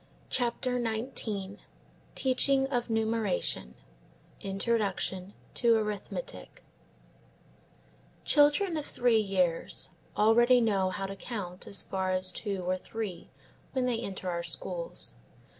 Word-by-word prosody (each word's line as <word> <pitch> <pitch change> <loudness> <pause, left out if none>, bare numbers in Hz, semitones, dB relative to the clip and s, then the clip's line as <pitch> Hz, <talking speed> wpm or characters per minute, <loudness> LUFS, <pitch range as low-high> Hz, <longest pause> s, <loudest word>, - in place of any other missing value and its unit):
CHAPTER 245 0 +1
XIX 220 -4 -1 0.5
TEACHING 270 +1 +3
OF 245 -3 -1
NUMERATION; 220 - 0 0.7
INTRODUCTION 195 -2 -1 0.2
TO 235 -1 +4
ARITHMETIC 210 - -5 1.6
CHILDREN 300 +5 +4
of 300 - -3
three 240 -2 +3
years 185 -5 0 0.3
already 240 +4 +6
know 200 -5 +2
how 195 +1 -3
to 195 0 -5
count 195 -4 -5
as 200 - 0
far 190 -1 -2
as 185 0 +2
two 195 -1 -3
or 185 0 +1
three 215 -5 -5 0.4
when 260 -2 +1
they 240 -2 +1
enter 195 -5 -4
our 170 0 -1
schools. 170 - -4
215 Hz, 110 wpm, -30 LUFS, 190-240 Hz, 1.6 s, already